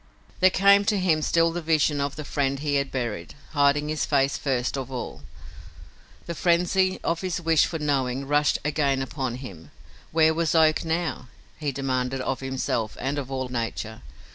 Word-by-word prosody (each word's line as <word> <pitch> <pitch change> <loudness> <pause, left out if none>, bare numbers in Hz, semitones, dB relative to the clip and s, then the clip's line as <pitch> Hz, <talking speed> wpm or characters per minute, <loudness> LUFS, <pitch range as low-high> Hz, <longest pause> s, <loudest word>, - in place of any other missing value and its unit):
There 185 - +6
came 200 +2 +5
to 210 0 +2
him 170 -5 +2
still 165 +2 +2
the 175 +1 -4
vision 155 -2 +2
of 140 0 -2
the 155 - -6
friend 140 -1 0
he 145 +1 -2
had 140 -1 0
buried, 115 -9 -4 0.2
hiding 145 0 +2
his 155 0 -1
face 140 -1 +2
first 130 -3 -1
of 135 -1 -5
all. 125 -2 -6 1.0
The 170 - -4
frenzy 180 +3 +2
of 165 0 -1
his 185 -2 -2
wish 165 -3 +3
for 165 - -4
knowing 135 -3 -1
rushed 145 0 +2
again 140 -3 +1
upon 130 -2 -3
him. 100 -11 -10 0.4
Where 160 0 +4
was 165 0 0
Oak 155 -1 +4
now? 165 -5 -2 0.3
he 150 -2 -1
demanded 130 -1 -2
of 130 0 -2
himself 130 -4 -2
and 140 +3 -2
of 135 -2 -6
all 130 -1 -3
nature. 115 -2 -4
145 Hz, 175 wpm, -25 LUFS, 130-160 Hz, 1.0 s, There